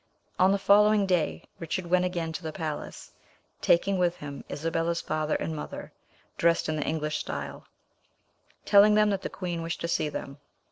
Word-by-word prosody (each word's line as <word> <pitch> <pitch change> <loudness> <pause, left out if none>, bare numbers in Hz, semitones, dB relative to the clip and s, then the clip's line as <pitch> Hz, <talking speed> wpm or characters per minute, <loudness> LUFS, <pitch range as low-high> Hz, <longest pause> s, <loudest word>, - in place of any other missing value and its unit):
On 185 +1 +5
the 200 - +3
following 210 +1 +5
day, 180 -4 0 0.2
Richard 175 +2 -3
went 180 +1 +2
again 170 -3 -2
to 160 - -5
the 160 -2 -5
palace, 155 -1 -6 0.5
taking 190 +2 +3
with 175 -1 +2
him 140 -2 -8
Isabella's 165 +2 -1
father 155 0 -1
and 160 - -3
mother, 150 - -7 0.5
dressed 170 0 +3
in 155 - -1
the 150 - -2
English 155 -1 -1
style, - - -6 1.0
telling 210 +1 +6
them 210 0 +4
that 195 -1 -1
the - - -4
queen 175 -3 -4
wished 165 +1 -4
to 170 - -1
see 155 -2 0
them. 140 -1 -7
170 Hz, 175 wpm, -27 LUFS, 155-185 Hz, 1.0 s, telling